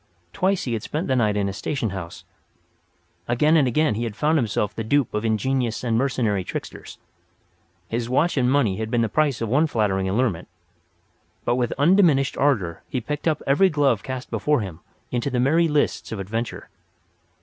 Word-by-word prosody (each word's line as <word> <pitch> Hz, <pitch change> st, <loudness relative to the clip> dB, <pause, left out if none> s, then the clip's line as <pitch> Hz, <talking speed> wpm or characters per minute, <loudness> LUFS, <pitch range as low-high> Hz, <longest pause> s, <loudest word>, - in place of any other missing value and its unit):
Twice 190 Hz, 0 st, +1 dB
he 120 Hz, -, -2 dB
had 110 Hz, -, -2 dB
spent 155 Hz, -, -3 dB
the 130 Hz, -, +1 dB
night 105 Hz, -4 st, +2 dB
in 100 Hz, -1 st, 0 dB
a 100 Hz, -, -3 dB
station 115 Hz, +1 st, -3 dB
house; 85 Hz, -3 st, -7 dB, 1.0 s
again 150 Hz, +7 st, +3 dB
and 145 Hz, -5 st, +4 dB
again 140 Hz, 0 st, +2 dB
he 115 Hz, +3 st, -3 dB
had 115 Hz, -3 st, -4 dB
found 155 Hz, +5 st, +2 dB
himself 105 Hz, -3 st, -1 dB
the 110 Hz, -, -4 dB
dupe 140 Hz, +3 st, +1 dB
of 105 Hz, +1 st, -1 dB
ingenious 120 Hz, +2 st, 0 dB
and 115 Hz, -2 st, 0 dB
mercenary 115 Hz, -6 st, 0 dB
tricksters; -, -, -7 dB, 0.9 s
his 115 Hz, +3 st, -3 dB
watch 150 Hz, +7 st, +2 dB
and 125 Hz, -2 st, +2 dB
money 120 Hz, -9 st, +2 dB
had 110 Hz, 0 st, -3 dB
been 120 Hz, 0 st, +1 dB
the 115 Hz, -, -1 dB
price 145 Hz, -4 st, +1 dB
of 115 Hz, -, -2 dB
one 150 Hz, +7 st, +3 dB
flattering 95 Hz, -7 st, 0 dB
allurement. 105 Hz, -4 st, 0 dB, 1.0 s
But 120 Hz, -, +2 dB
with 120 Hz, -2 st, 0 dB
undiminished 150 Hz, -3 st, +4 dB
ardour 100 Hz, -, 0 dB
he 130 Hz, -, -1 dB
picked 150 Hz, +6 st, -4 dB
up 155 Hz, -, 0 dB
every 165 Hz, +8 st, +4 dB
glove 140 Hz, -, +2 dB
cast 130 Hz, -1 st, -6 dB
before 150 Hz, -4 st, +1 dB
him 90 Hz, -5 st, -7 dB, 0.3 s
into 125 Hz, +2 st, -1 dB
the 125 Hz, -2 st, -1 dB
merry 160 Hz, +7 st, +3 dB
lists 150 Hz, -2 st, 0 dB
of 110 Hz, -, -4 dB
adventure. 115 Hz, +5 st, -4 dB
125 Hz, 185 wpm, -23 LUFS, 110-145 Hz, 1.0 s, and